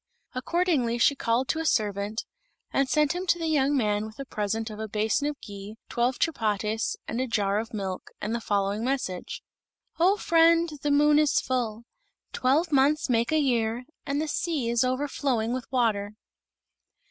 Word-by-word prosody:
Accordingly 270 -4 0
she 240 - +4
called 250 +3 0
a 320 - -2
servant 210 -5 0 0.5
and 275 -1 +2
sent 300 +3 +3
him 360 +2 -4
to 345 - +3
the 330 - -3
young 290 -2 +2
man 210 -3 0
with 220 - -13
a 275 - -6
present 220 0 -2
of 210 - -8
a 220 - -3
basin 215 +6 0
of 295 -1 -4
ghee, 200 +1 -9
twelve 240 +2 0
chapatis, 220 - 0
and 235 +3 -2
a 260 - -1
jar 205 -3 +1
of 225 +1 -5
milk, 195 -4 -4
and 210 +2 -3
the 235 - -2
following 205 +1 0
message: 250 -9 -3 0.6
"O 375 +5 +4
friend, 335 -2 +4
the 295 - 0
moon 295 +1 +5
is 300 -2 +3
full; 235 -3 -2 0.5
twelve 300 +7 +2
months 280 0 +3
make 235 +2 +2
a 315 - +3
year, 240 -4 +1 0.2
and 280 +1 -2
the 315 - -1
sea 295 -6 -1
is 235 +1 +2
overflowing 255 -3 0
with 255 -1 -5
water." 215 -5 0
245 Hz, 170 wpm, -27 LUFS, 215-290 Hz, 0.6 s, moon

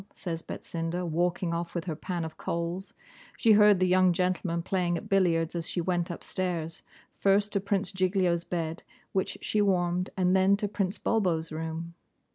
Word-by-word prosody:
says 165 -3 -4
Betsinda, 170 +2 -4
walking 175 +1 0
off 170 +1 -3
with 170 - -2
her 165 -4 -3
pan 175 +1 -3
of 160 - -7
coals. 170 +3 -3 0.5
She 230 - +4
heard 210 -2 +7
the 185 - +3
young 185 0 +4
gentlemen 175 -1 0
playing 175 -2 0
at - - -8
billiards 170 -4 +2
as 170 -1 -3
she - - -2
went 175 0 0
upstairs: 170 -2 -3 0.4
first 200 +1 +3
to 200 - +2
Prince 200 0 -1
Giglio's 185 -2 +1
bed, 165 -1 -3 0.3
which 190 - -1
she 210 - +1
warmed, 180 -2 +1
and 185 0 +3
then 190 +1 +4
to 205 - -1
Prince 195 -1 -1
Bulbo's 175 -8 0
room. 160 +1 -5
180 Hz, 170 wpm, -28 LUFS, 170-190 Hz, 0.5 s, heard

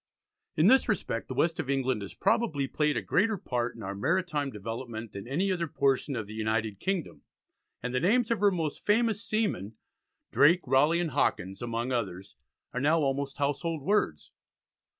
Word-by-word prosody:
In 155 - +3
this 260 +4 +5
respect, 165 - -1
the 130 - -5
west 165 +5 +1
of 145 -4 -3
England 130 -4 0
has 100 - -7
probably 150 - +1
played 150 +2 0
a - - -2
greater 215 +2 +2
part 120 -6 -2
in 115 - -9
our 95 +1 -4
maritime 150 - 0
development 115 0 -6
than 100 +3 -7
any 180 +9 0
other 170 -2 -1
portion 140 -1 +1
of 115 -3 -3
the 105 - -10
United 110 -2 -1
Kingdom, 190 -4 -3 0.6
and 125 +1 -3
the 125 - +2
names 225 - +2
of 230 - +1
her 205 0 +5
most 165 -6 -3
famous 225 0 +2
seamen 205 - -1 0.6
Drake, 170 +6 +5
Raleigh, 145 +7 +3
and 165 -3 -2
Hawkins 95 -8 0
among 120 +1 -2
others 100 -6 -3 0.4
are 125 - -2
now 155 +4 +3
almost 140 -1 -1
household 145 +2 -1
words. 145 - 0
140 Hz, 175 wpm, -29 LUFS, 115-175 Hz, 0.6 s, this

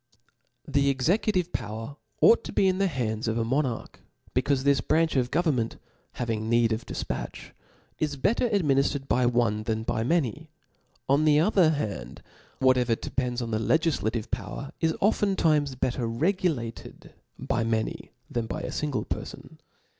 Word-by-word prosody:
Tht 140 0 +2
executive 180 - +1
power 115 +4 -5 0.3
ought 230 - +6
to - - -5
be 195 - +3
in 185 0 +1
the 195 - +3
hands 115 - -2
of 110 +1 0
a 115 - 0
monarch, 130 -1 -2 0.3
becaufe 130 +1 +1
this 140 -3 +3
branch 160 +4 +1
of 125 -2 +1
government, 135 -10 0 0.4
having 110 -2 -2
need 115 -1 +3
of 110 +2 -5
difpatch, - - -5 0.5
is 150 -2 -1
better 215 - +1
adminiftered 140 -7 +1
by 125 0 +2
one 120 -3 +1
than 110 0 -2
by 110 - -1
many; 155 +1 0 0.6
on 140 +3 +3
the 150 -1 +5
other 180 -1 +4
hand, 105 - -4 0.3
what 130 -1 +4
evier 120 -2 +1
depends 125 -1 -2
on 115 - -5
the 110 - 0
legiflative 120 -6 0
power, 115 +5 -4
is 160 -1 +1
often 205 -1 +2
times 150 -6 +2
better 125 -1 -1
regulated 145 - -2 0.2
by 115 - -1
many 110 -1 -2 0.2
than 120 -2 -3
by 155 - -4
a - - -4
fmgle 145 -4 -2
perfon. - - -7
130 Hz, 155 wpm, -27 LUFS, 115-155 Hz, 0.6 s, ought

